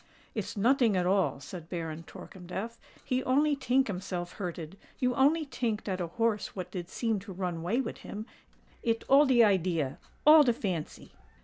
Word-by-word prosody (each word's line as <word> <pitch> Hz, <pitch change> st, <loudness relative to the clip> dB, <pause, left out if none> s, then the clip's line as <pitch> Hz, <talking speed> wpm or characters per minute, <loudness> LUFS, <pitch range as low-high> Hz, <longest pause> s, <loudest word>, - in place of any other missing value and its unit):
"It's -, -, -4 dB
noting 235 Hz, -1 st, +3 dB
at 180 Hz, -, +1 dB
all," 185 Hz, -7 st, +2 dB
said 165 Hz, +3 st, -9 dB
Baron 165 Hz, -2 st, -4 dB
Torkemdef: 190 Hz, +7 st, -8 dB, 0.3 s
"he 255 Hz, -1 st, 0 dB
only 290 Hz, +3 st, +3 dB
tink 265 Hz, 0 st, +2 dB
himself 180 Hz, -3 st, -4 dB
hurted—you 185 Hz, +7 st, -4 dB
only 300 Hz, +5 st, +3 dB
tink 230 Hz, -6 st, -2 dB
dat 185 Hz, -2 st, -3 dB
a 175 Hz, -, -2 dB
horse 220 Hz, +3 st, -1 dB
what 185 Hz, -3 st, -5 dB
did 175 Hz, -2 st, -5 dB
seem 225 Hz, -1 st, -1 dB
to 195 Hz, +1 st, -10 dB
run 180 Hz, -3 st, -3 dB
way 210 Hz, +10 st, 0 dB
wid -, -, -6 dB
him:—it 225 Hz, +1 st, -6 dB
all 280 Hz, +2 st, +6 dB
de 245 Hz, -3 st, +6 dB
idea—all 185 Hz, -, +3 dB
de 250 Hz, -5 st, +4 dB
fancy." 180 Hz, -8 st, -4 dB
205 Hz, 155 wpm, -30 LUFS, 180-250 Hz, 0.3 s, all